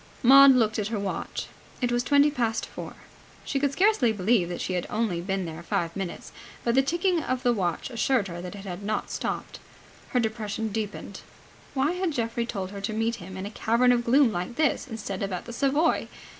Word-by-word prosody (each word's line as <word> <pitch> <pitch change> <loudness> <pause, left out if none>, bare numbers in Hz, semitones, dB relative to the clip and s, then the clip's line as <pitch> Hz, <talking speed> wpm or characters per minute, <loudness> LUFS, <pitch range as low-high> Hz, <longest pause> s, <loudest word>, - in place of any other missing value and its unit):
Maud 270 +2 +9
looked 220 -3 +2
at 205 - -1
her 220 0 -2
watch. 200 -1 -3 0.3
It 245 -2 0
was 240 0 +2
twenty 285 +3 +4
past 230 -5 -1
four. - - -8 0.5
She 275 - -1
could 285 0 +1
scarcely 365 - +3
believe 205 -2 +2
that 175 - -4
she 185 - -2
had 180 -1 -2
only 210 -6 -1
been 190 0 -2
there 160 0 -7
five 170 -1 -2
minutes, 190 -3 -5 0.3
but 235 - +1
the 265 - +5
ticking 345 +4 +1
of 255 -3 -2
the 245 - +3
watch 185 +2 -2
assured 235 -2 +1
her 175 -1 -6
that 180 +2 -7
it 200 0 -9
had 180 0 -6
not 215 +2 -2
stopped. - - -4 0.5
Her 250 - +1
depression 220 -1 -2
deepened. 210 -1 -5 0.5
Why 275 +4 +2
had 360 -2 -1
Geoffrey 235 -1 -1
told 190 -4 -4
her 200 -1 -7
to 200 +2 -2
meet 225 +2 0
him 185 -1 -9
in 190 - -5
a 205 - -6
cavern 235 +3 +3
of 240 -1 +2
gloom 255 +1 +4
like 180 +4 -4
this 305 -1 +1
instead 215 -5 -5
of 200 -1 -2
at 180 - -4
the 235 - -8
Savoy? 280 +6 +1
225 Hz, 210 wpm, -26 LUFS, 195-260 Hz, 0.5 s, Maud